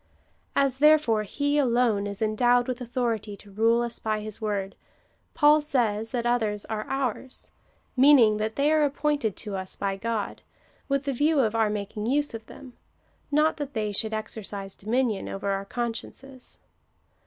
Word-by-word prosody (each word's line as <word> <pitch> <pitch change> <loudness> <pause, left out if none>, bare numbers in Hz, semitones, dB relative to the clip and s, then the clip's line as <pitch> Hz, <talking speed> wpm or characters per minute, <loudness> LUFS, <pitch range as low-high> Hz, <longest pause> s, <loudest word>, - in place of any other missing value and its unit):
As, 275 -2 +2
therefore, 300 -7 +5
he 285 +8 0
alone 235 -6 +2
is 200 +1 -4
endowed 245 +3 +3
with 255 0 -3
authority 230 -4 -2
to 205 - -16
rule 230 +3 +2
us 235 -1 -3
by 215 -1 -1
his 215 0 -7
word, 200 -2 -2 0.6
Paul 300 +1 +5
says 225 -7 0
that 240 -1 -2
others 220 -4 0
are 215 -1 -4
ours 260 -1 -3 0.2
— - - -40
mean 280 +3 +7
ing, 215 -4 +4
that 215 +1 -2
they 285 +2 +2
are 310 -1 +4
appointed 285 -6 0
to 210 -3 -5
us 190 -1 -4
by 195 -1 -3
Grod 225 -1 -3 0.5
with 275 0 +1
the 275 0 -2
view 295 +4 +2
of 220 -3 +1
our 225 -2 +2
making 210 +1 -4
use 290 +2 +1
of 225 -1 -8
them 255 -2 -12 0.3
— - - -39
not 305 +2 +3
that 290 -3 -6
they 215 -1 -1
should 220 +2 -1
exercise 210 -3 -5
dominion 225 0 -1
over 195 +1 -4
our 195 0 -2
consciences. 245 +4 -6
230 Hz, 175 wpm, -26 LUFS, 210-270 Hz, 0.6 s, mean